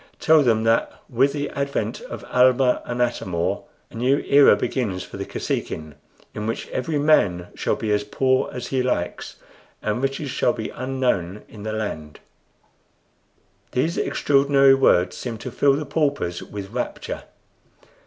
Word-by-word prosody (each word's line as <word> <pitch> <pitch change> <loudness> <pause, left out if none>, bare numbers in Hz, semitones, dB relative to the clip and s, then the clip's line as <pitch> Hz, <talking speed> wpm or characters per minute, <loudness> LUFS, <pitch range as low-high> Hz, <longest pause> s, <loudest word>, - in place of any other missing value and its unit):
Tell 160 -1 +5
them 115 -5 +2
that 115 +1 +2 0.2
with 130 +4 +3
the 145 0 -3
advent 140 - -2
of - - -8
Almah 125 0 +4
and 125 0 0
Atam 105 -7 -3
or 85 0 -1 0.3
a - - -13
new 130 +4 +2
era 140 -5 +6
begins 100 -4 -2
for - - -10
the - - -5
Kosekin, 75 -1 -4 0.4
in 105 0 -4
which 115 - -3
every 150 +4 -2
man 100 - +2 0.2
may - - +3
be 110 -1 -3
as 105 0 +2
poor 130 +5 +1
as 125 -1 -6
he 130 -1 +1
likes, 125 -9 -2 0.4
and 110 +3 -2
riches 135 +1 -2
shall 120 - +1
be 110 - -5
unknown 125 -8 -2
in 105 - -12
the 110 +1 -4
land." 80 -9 -5 1.5
These 160 +7 0
extraordinary 140 -1 +4
words 130 -9 +3
seemed 115 -3 -6
to - - -6
fill 140 -1 +3
the 150 +2 -3
paupers 140 - -1
with 100 -2 -8
rapture. - - -4
125 Hz, 155 wpm, -23 LUFS, 105-140 Hz, 1.5 s, era